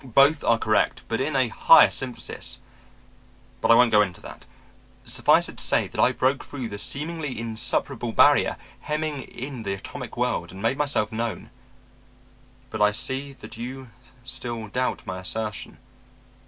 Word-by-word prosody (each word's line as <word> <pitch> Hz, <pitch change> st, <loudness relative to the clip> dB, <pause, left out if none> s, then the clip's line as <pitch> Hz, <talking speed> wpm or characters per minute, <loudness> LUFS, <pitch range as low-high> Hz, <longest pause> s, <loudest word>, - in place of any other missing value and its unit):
Both 140 Hz, +4 st, +4 dB
are 115 Hz, -, +3 dB
correct, 110 Hz, -1 st, +1 dB
but 115 Hz, +2 st, -1 dB
in 145 Hz, +2 st, -1 dB
a 130 Hz, -3 st, +2 dB
higher 165 Hz, -, +7 dB
synthesis 130 Hz, -2 st, -2 dB, 1.0 s
But -, -, +1 dB
I 115 Hz, -, +8 dB
won't 120 Hz, -1 st, +5 dB
go 105 Hz, -, +6 dB
into 90 Hz, -4 st, -2 dB
that. -, -, -11 dB, 0.6 s
Suffice -, -, +3 dB
it -, -, -11 dB
to -, -, -1 dB
say -, -, +1 dB
that -, -, -2 dB
I -, -, +5 dB
broke 130 Hz, +2 st, 0 dB
through 130 Hz, -5 st, -6 dB
the 100 Hz, -1 st, -7 dB
seemingly 150 Hz, +1 st, -4 dB
insuperable 115 Hz, -1 st, -2 dB
barrier -, -, +4 dB, 0.2 s
hemming 150 Hz, -2 st, -3 dB
in 130 Hz, -1 st, -7 dB
the 100 Hz, -3 st, -2 dB
atomic 95 Hz, -, -8 dB
world -, -, -1 dB
and 95 Hz, -, -10 dB
made 115 Hz, +6 st, 0 dB
myself 140 Hz, -8 st, 0 dB
known. 115 Hz, 0 st, -4 dB, 1.2 s
But 110 Hz, -, -4 dB
I 105 Hz, -, +6 dB
see 130 Hz, +6 st, -3 dB
that 120 Hz, -5 st, -12 dB
you 130 Hz, +1 st, -7 dB, 0.3 s
still 120 Hz, -3 st, -6 dB
doubt 125 Hz, +4 st, -2 dB
my 95 Hz, 0 st, -5 dB
assertion. 105 Hz, +3 st, -4 dB
120 Hz, 160 wpm, -25 LUFS, 110-135 Hz, 1.2 s, I